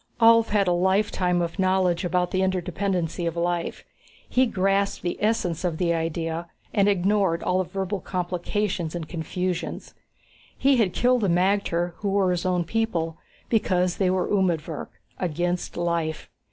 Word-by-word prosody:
Ulv 230 0 +6
had 205 -2 +2
a - - +3
lifetime 180 -1 +2
of 170 +3 -5
knowledge 185 -2 +2
about 180 0 0
the 185 - 0
interdependency 180 -2 -1
of 165 - -2
life. 175 0 -1 0.4
He 255 0 +3
grasped 195 -1 0
the 175 - -1
essence 200 -6 0
of 170 -3 -1
the 170 -1 +1
idea 165 +1 -2 0.3
and 205 -2 +4
ignored 195 -2 +1
all 180 +1 +1
the - - -14
verbal 195 +1 -2
complications 180 -1 -2
and 165 -2 -4
confusions. 180 +2 -4 0.6
He 270 0 +4
had 205 -6 +2
killed 250 0 +3
the 200 - +2
magter, 175 -1 +1
who 205 - -2
were 195 -2 +2
his 180 0 -1
own 180 -1 +1
people, 170 -5 -1 0.3
because 185 -5 +1
they 190 -2 +2
were 185 0 +1
umedvirk 170 -6 0 0.3
against 175 +1 -2
life. 170 -2 -2
180 Hz, 155 wpm, -25 LUFS, 170-200 Hz, 0.6 s, Ulv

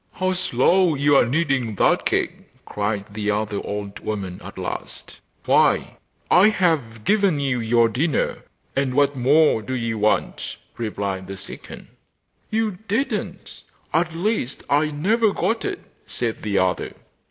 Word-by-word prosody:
'How 185 0 0
slow 180 +1 +3
you 145 +1 +3
are 120 - +5
kneading 135 -6 0
that - - +2
cake,' - - -3
cried 105 -1 -2
the 105 -1 -2
other 105 -1 -1
old 100 -1 -5
woman 95 -4 -5
at - - -10
last. - - -6 0.3
'Why, - - +3 0.3
I 195 +4 +7
have 150 - 0
given 200 - +2
you 135 -3 0
your 115 0 +3
dinner, 135 +8 0 0.4
and 135 -2 0
what 145 0 +3
more 135 0 +4
do 130 +4 -4
you 115 -3 -2
want?' 105 +1 0 0.2
replied 100 -4 -3
the 95 0 -7
second. - - -10 0.6
'You 220 -4 -1
didn't; 230 +8 -3 0.3
at 165 0 +1
least 180 - -2
I 150 +2 +3
never 205 +9 +2
got 225 +1 0
it,' - - -4 0.2
said 115 -2 -3
the 100 -2 -1
other. 95 -1 0
130 Hz, 140 wpm, -22 LUFS, 105-170 Hz, 0.6 s, I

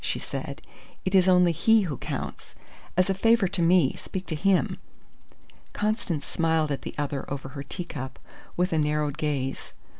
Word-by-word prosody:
she - - -1
said. - - -5 0.4
"It 185 - -1
is 190 -1 +5
only 180 -1 +5
he 225 +7 +4
who 165 -8 -2
counts. - - -6 0.4
As 185 - +4
a 195 - +2
favour 225 +1 +3
to 185 -1 -1
me, 170 -5 +4
speak 190 0 -6
to 160 - -2
him." 190 +4 +2 0.9
Constance 210 -8 -1
smiled 160 -2 +1
at 140 - -2
the - - -7
other 145 -2 -2
over 135 -1 -4
her 140 +1 -7
teacup, 140 -4 -6 0.4
with 180 0 +1
a 160 - +2
narrowed 150 -1 0
gaze. 135 -3 -2
165 Hz, 170 wpm, -26 LUFS, 145-185 Hz, 0.9 s, is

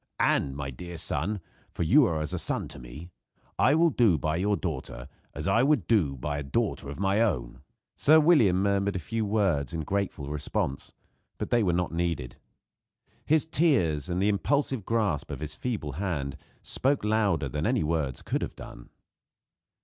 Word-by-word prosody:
And, 70 -1 +2
my 70 -1 -4
dear 85 +7 -8
son 95 +7 -2 0.3
for - - -1
you 135 - +6
are 80 -4 -1
as 75 - -4
a - - -1
son - - -2
to - - -8
me 70 +9 -10 0.5
I 145 - +5
will 165 0 +4
do 110 - +3
by 75 +3 -1
your 100 +3 +1
daughter 65 -6 -5 0.3
as 75 +6 -4
I 95 +4 +4
would 135 - +2 0.3
by 75 +3 -2
a - - -4
daughter 70 0 -2
of 75 - -7
my 100 +1 +2
own." 70 - -1 0.3
Sir 155 +2 +6
William 120 - +4
murmured 100 0 +1
a - - +1
few 110 +6 -3
words 95 - 0
in 80 - -2
grateful 95 -3 -2
response; 70 -1 -3 0.5
but - - -5
they 120 - +4
were 95 -5 +2
not 90 0 0
needed. 85 -8 -2 0.9
His 155 0 +3
tears, 105 - +1
and 90 +1 -1
the 100 +2 +2
impulsive 130 +2 0
grasp 110 -10 0
of 70 -4 -5
his 75 0 -5
feeble 110 -12 -3
hand, 75 -4 -3 0.3
spoke 140 -1 0
louder 105 -8 +1
than 60 - -2
any - - +1
words 75 -5 -2
could - - -2
have - - -4
done. - - -11
90 Hz, 180 wpm, -27 LUFS, 75-110 Hz, 0.9 s, you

